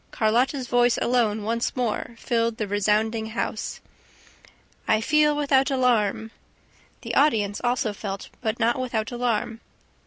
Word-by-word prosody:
Carlotta's 245 +4 +1
voice 245 0 +3
alone 225 -4 +1
once 230 +2 -1
more 240 -1 -2
filled 230 -2 -1
the 215 -3 -2
resounding 215 +2 0
house: 220 -1 -4 1.1
"I 220 - +3
feel 300 +5 +3
without 280 -2 +2
alarm 225 -5 +1 0.3
..." - - -33
The - - -4
audience 215 -9 +2
also 240 -3 0
felt, 200 -1 -6
but 225 -1 -2
not 235 +2 +1
without 235 -3 -2
alarm. 235 -2 -1
230 Hz, 130 wpm, -24 LUFS, 215-250 Hz, 1.1 s, voice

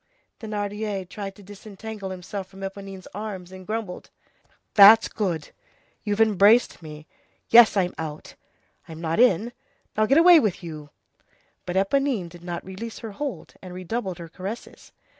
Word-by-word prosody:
Thénardier 205 -2 -4
tried 195 0 -7
to 205 - -15
disentangle 205 +1 -8
himself 190 +1 -6
from 195 0 -14
Éponine's 195 -1 -8
arms, 195 -3 -6
and 185 -1 -11
grumbled:— 215 -4 -5 0.6
"That's 210 +2 +9
good. 170 -8 -3 0.5
You've 205 -1 -2
embraced 215 0 +4
me. 155 -1 -10 0.4
Yes, 230 -2 +7
I'm 180 -2 +1
out. 155 -1 -6 0.5
I'm 160 -1 -9
not 165 +2 -2
in. 235 -1 +4 0.4
Now, 215 0 +2
get 275 - +4
away 340 0 +8
with 200 - -1
you." 155 -3 -8 0.8
But 175 - -3
Éponine 210 -1 +1
did 175 0 -14
not 175 -1 -5
release 205 +5 -7
her 225 - -7
hold, 280 +5 -6
and 180 -1 -9
redoubled 185 0 -4
her 170 - -8
caresses. 190 +7 -8
195 Hz, 145 wpm, -24 LUFS, 180-220 Hz, 0.8 s, That's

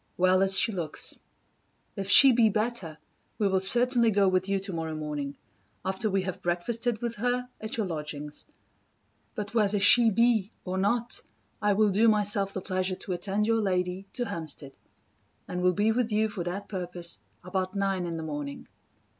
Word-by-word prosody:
well 185 +1 +3
as 195 0 +4
she - - +4
looks. 170 -6 -2 0.8
If 195 -2 -4
she 270 +6 +9
be 230 -2 +4
better, 215 -7 -2 0.4
we 205 - +1
will 190 -1 +1
certainly 240 +4 +4
go 200 -2 +2
with 185 +1 +1
you 195 0 +1
tomorrow 165 -5 -4
morning, 150 -2 -5 0.5
after 190 +3 -1
we 195 -1 0
have 185 0 -5
breakfasted 220 +7 -2
with 235 -2 -3
her, 245 +2 -1
at 220 +1 -3
your 220 - 0
lodgings. 150 -3 -5 0.9
But 210 0 -5
whether 210 -3 +1
she 235 +3 +7
be, 225 -2 +2 0.2
or 185 0 -3
not, 235 +4 -1 0.4
I 205 0 +2
will 210 0 +2
do 215 +4 +3
myself 205 -2 +1
the 190 - -5
pleasure 185 0 -2
to 185 - -5
attend 195 +4 -1
your 225 0 +1
lady 185 -1 -2
to 245 - -2
Hampstead; 160 - -7 0.7
and 180 - -4
will 180 0 +3
be 210 +4 +1
with 235 0 -1
you 215 +1 +1
for 200 -5 -5
that 185 +3 -5
purpose 180 -3 -5 0.2
about 185 +1 -3
nine 195 -3 -1
in 165 -1 -4
the 160 - -5
morning. 145 -2 -6
195 Hz, 175 wpm, -27 LUFS, 180-220 Hz, 0.9 s, she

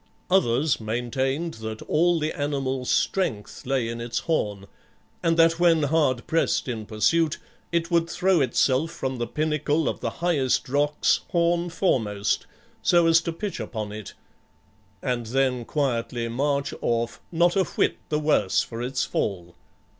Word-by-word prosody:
Others 140 -6 +3
maintained 130 +8 -2
that 110 0 -5
all 170 +2 +2
the 155 0 -1
animal's 135 -3 -2
strength 125 - -1
lay 130 -3 +1
in 115 0 -5
its 120 0 -3
horn, 105 -11 -1 0.6
and 165 0 +2
that 165 0 +4
when 165 -3 +4
hard 145 -5 +1
pressed 165 -3 +1
in 110 -4 -4
pursuit, 155 +9 +2 0.3
it 170 0 0
would 170 -1 +2
throw 185 -3 +2
itself 130 +4 +2
from 130 -5 -4
the 120 - -1
pinnacle 155 +2 0
of - - -2
the - - -2
highest 155 -7 0
rocks 145 +2 +2
horn 170 0 +1
foremost, 105 - 0 0.3
so 175 -1 +4
as 165 0 +5
to 170 - -3
pitch 200 +4 -5
upon 110 -3 -5
it, 105 -1 -8 0.9
and 120 -3 -1
then 130 0 0
quietly 120 -4 -1
march 140 +4 -1
off 115 0 -1
not 175 +2 +3
a 195 - +4
whit - - 0
the 150 - +1
worse 150 -10 +2
for 115 0 -7
its 125 0 -1
fall. 90 -4 -3
140 Hz, 150 wpm, -25 LUFS, 120-165 Hz, 0.9 s, as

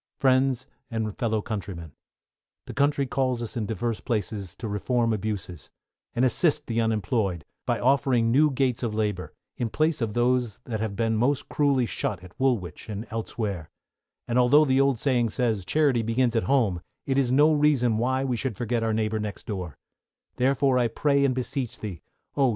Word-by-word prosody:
Friends 130 -2 +2 0.2
and 110 -2 -3
Fellow 110 -4 0
Countrymen, 95 -7 -5 0.7
The - - -8
country 145 0 +2
calls 125 -2 -1
us 115 - -6
in 110 -4 -2
divers 115 +1 -2
places 100 -5 -3
to 115 - -6
reform 115 +3 0
abuses, 100 -4 -4 0.5
and 125 - +3
assist 150 +5 +2
the 115 0 0
unemployed, 105 -5 0 0.2
by - - +1
offering 130 -3 +3
new 150 +5 +5
gates 130 -3 0
of 115 -4 -2
labor, 105 -4 -2 0.3
in 120 - -1
place 155 +6 0
of 110 -3 -2
those 120 -2 +1
that 110 -3 -4
have 110 -2 -3
been 115 0 +1
most 130 +5 +1
cruelly 140 -4 +2
shut 95 -4 -3
at 90 - -12
Woolwich 120 -8 -1
and 105 +2 -4
elsewhere, 105 -6 -4 0.6
and 120 +1 +2
although 140 +5 +6
the 135 -1 +3
old 135 -2 +2
saying 120 -2 +1
says 110 -5 -1
"Charity 140 - +2
begins 115 +2 +1
at 115 - +1
home," 115 -11 +2 0.2
it 135 0 +1
is 125 -3 +1
no 150 +4 +5
reason 135 -7 +3
why 130 +3 +1
we 130 -2 0
should 115 -3 -3
forget 120 0 -1
our 115 -1 0
neighbour 110 0 0
next 105 -1 -5
door; 90 - -5 0.6
therefore 130 0 +3
I 120 - +3
pray 140 +4 +1
and 130 -2 +2
beseech 130 -1 -3
thee, 100 -6 -6 0.3
oh! 135 -2 +3
120 Hz, 180 wpm, -26 LUFS, 110-130 Hz, 0.7 s, although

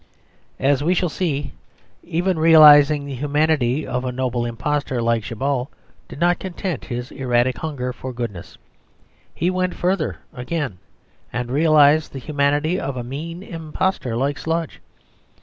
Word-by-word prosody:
As 140 +1 +2
we 175 +4 +2
shall 180 0 +1
see, 145 -5 -2 0.5
even 175 +1 -1
realising 150 -2 +7
the 140 - -6
humanity 145 0 +1
of 125 -1 -3
a 130 - -2
noble 125 -1 -2
impostor 135 +2 -2
like 115 -1 +1
Djabal 130 +3 -2 0.4
did - - -10
not 175 +1 +2
content 185 -1 -4
his 125 0 -5
erratic 125 -1 0
hunger 130 -5 -4
for 130 +1 -7
goodness. 115 -8 -6 0.8
He 175 +2 0
went 185 0 -1
further 180 -2 -1 0.2
again, 125 - -4 0.5
and 120 0 -4
realised 155 +1 +4
the - - -6
humanity 145 +5 0
of 135 -2 -4
a 120 - -3
mean 165 +8 -6
impostor 165 - -3
like 140 +2 -1
Sludge. 165 0 -3
145 Hz, 140 wpm, -21 LUFS, 125-160 Hz, 0.8 s, realising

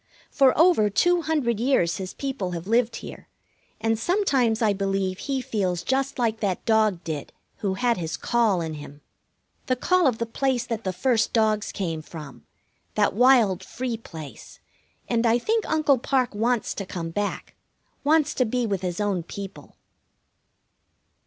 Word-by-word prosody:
For 270 -3 +4
over 320 -10 +5
two 350 - +3
hundred 285 -9 0
years 230 -10 +2
his 185 -1 -6
people 260 -10 -3
have 170 0 -5
lived 230 +3 +2
here, - - -9 0.5
and 225 0 0
sometimes 265 - +2
I 215 -3 +3
believe 195 -1 -1
he 270 +2 -2
feels 185 -7 -1
just 270 +1 -1
like 225 -3 0
that 195 -4 -2
dog 215 -6 +2
did 155 -3 -5 0.3
who 195 -2 -2
had 240 +1 +1
his 160 -2 -3
call 225 -7 +1
in 160 -1 -4
him. 145 -1 -10 0.7
The 255 - +2
call 360 +5 +3
of 245 -4 +1
the 230 - -1
place 250 +1 -1
that 230 -3 -4
the 185 - 0
first 225 +4 +1
dogs 215 -2 +1
came 165 -5 -3
from, 150 -4 -11 0.5
that - - +2
wild, 225 -5 +4
free 250 +3 -4
place, 160 -10 -10 0.5
and 235 -1 +1
I 230 0 +4
think 440 - -1
Uncle 295 -4 +3
Parke 255 -1 0
wants 230 +2 0
to 195 - -5
come 165 -3 -5
back, 205 +4 -3 0.5
wants 300 +1 +3
to 255 - +1
be 245 +2 -1
with 200 -4 -1
his 180 0 -3
own 205 -4 0
people. 195 +3 -9
225 Hz, 165 wpm, -25 LUFS, 190-255 Hz, 0.7 s, over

